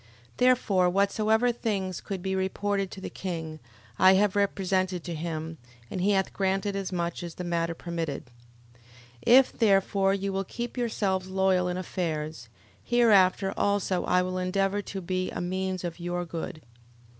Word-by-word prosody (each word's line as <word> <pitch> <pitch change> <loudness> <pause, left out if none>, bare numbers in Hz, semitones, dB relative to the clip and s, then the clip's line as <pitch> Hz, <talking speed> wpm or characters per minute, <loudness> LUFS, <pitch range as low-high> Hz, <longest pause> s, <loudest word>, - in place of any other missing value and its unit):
11:18. 115 - -26 0.3
Therefore 215 -8 +3
whatsoever 215 +5 +2
things 195 -6 -2
could 195 -3 -5
be 190 0 -1
reported 195 +1 -1
to 190 - -9
the - - -6
king, 160 -4 -5 0.4
I 185 0 +7
have 205 0 +2
represented 185 -3 0
to 175 - -5
him: 160 0 -5 0.3
and 185 - -3
he 195 - +2
hath 190 -1 0
granted 195 +1 0
as 195 -1 -3
much 170 -1 -2
as 170 -1 -7
the 180 - -5
matter 170 -1 -1
permitted. 165 -4 -4 0.5
11:19. 120 - -27 0.5
If, 255 +2 +7
therefore, 195 -2 +3
you 195 0 -3
will 195 0 -1
keep 240 +5 -6
yourselves 200 -6 -1
loyal 190 -1 +2
in 180 0 -2
affairs, 155 -8 -4 0.3
hereafter 200 - +4
also 200 -3 +1
I 180 0 +3
will 185 0 -2
endeavour 195 +2 0
to 195 -1 -6
be 185 +1 -2
a - - -5
means 185 +1 -2
of 175 -1 -5
your 175 0 -3
good. 165 -2 -6
190 Hz, 165 wpm, -27 LUFS, 175-200 Hz, 0.5 s, I